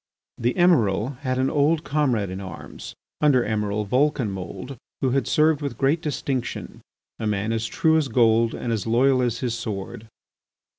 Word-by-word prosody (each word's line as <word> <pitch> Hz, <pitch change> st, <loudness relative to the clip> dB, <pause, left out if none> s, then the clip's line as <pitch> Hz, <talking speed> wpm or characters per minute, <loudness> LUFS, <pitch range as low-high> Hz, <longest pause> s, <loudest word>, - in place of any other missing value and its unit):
The 120 Hz, +2 st, 0 dB
Emiral 125 Hz, -, +2 dB
had 130 Hz, -3 st, -2 dB
an 130 Hz, +1 st, +1 dB
old 155 Hz, +2 st, +2 dB
comrade 130 Hz, -, 0 dB
in 95 Hz, +1 st, -5 dB
arms, 95 Hz, -, -9 dB, 0.3 s
Under 140 Hz, -5 st, +4 dB
Emiral 105 Hz, -1 st, -1 dB
Vulcanmould, 120 Hz, -, -1 dB, 0.2 s
who 130 Hz, -, +1 dB
had 135 Hz, +1 st, 0 dB
served 155 Hz, -1 st, +3 dB
with 140 Hz, -1 st, -4 dB
great 145 Hz, +4 st, +1 dB
distinction, 140 Hz, -5 st, -4 dB, 0.4 s
a 110 Hz, -, -2 dB
man 105 Hz, +1 st, -1 dB
as 115 Hz, 0 st, -1 dB
true 160 Hz, +7 st, +2 dB
as 155 Hz, -3 st, +1 dB
gold 115 Hz, -1 st, +3 dB
and 120 Hz, -, -3 dB
as 110 Hz, 0 st, -3 dB
loyal 130 Hz, +3 st, +3 dB
as 120 Hz, -2 st, -1 dB
his 125 Hz, -3 st, -1 dB
sword. 110 Hz, -1 st, -5 dB
125 Hz, 160 wpm, -24 LUFS, 110-140 Hz, 0.4 s, Under